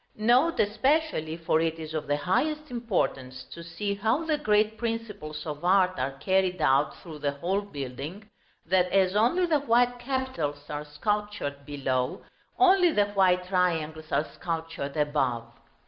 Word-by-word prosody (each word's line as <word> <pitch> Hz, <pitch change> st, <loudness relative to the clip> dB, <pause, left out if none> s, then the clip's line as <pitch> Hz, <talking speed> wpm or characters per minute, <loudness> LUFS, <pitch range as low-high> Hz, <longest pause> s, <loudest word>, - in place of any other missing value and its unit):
Note 245 Hz, +10 st, +3 dB
especially 220 Hz, -, +1 dB
for 165 Hz, -1 st, +1 dB
it 165 Hz, 0 st, -1 dB
is 160 Hz, -1 st, -7 dB
of 155 Hz, -2 st, -3 dB
the 145 Hz, 0 st, +1 dB
highest 300 Hz, -, -1 dB
importance 140 Hz, -, -2 dB
to 170 Hz, -, -11 dB
see 200 Hz, +5 st, -3 dB
how 220 Hz, +9 st, 0 dB
the 310 Hz, -2 st, 0 dB
great 215 Hz, -4 st, +2 dB
principles 215 Hz, -10 st, -5 dB
of 150 Hz, -1 st, -6 dB
art 185 Hz, 0 st, +4 dB
are 135 Hz, +2 st, -1 dB
carried 185 Hz, +5 st, 0 dB
out 140 Hz, -1 st, +2 dB
through 160 Hz, -4 st, -10 dB
the 145 Hz, -1 st, -1 dB
whole 180 Hz, +8 st, -1 dB
building 150 Hz, +3 st, -7 dB, 0.4 s
that, 180 Hz, +1 st, +2 dB
as 190 Hz, 0 st, +3 dB
only 245 Hz, +13 st, +3 dB
the 315 Hz, -4 st, +2 dB
white 245 Hz, -2 st, +2 dB
capitals 245 Hz, -, -3 dB
are 150 Hz, 0 st, -4 dB
sculptured 150 Hz, -3 st, -3 dB
below, 130 Hz, -3 st, -2 dB, 0.3 s
only 370 Hz, -2 st, +5 dB
the 205 Hz, -6 st, +2 dB
white 185 Hz, -2 st, +3 dB
triangles 160 Hz, -4 st, -1 dB
are 150 Hz, -, +2 dB
sculptured 165 Hz, -4 st, -4 dB
above. 140 Hz, -6 st, 0 dB
180 Hz, 150 wpm, -27 LUFS, 150-225 Hz, 0.4 s, only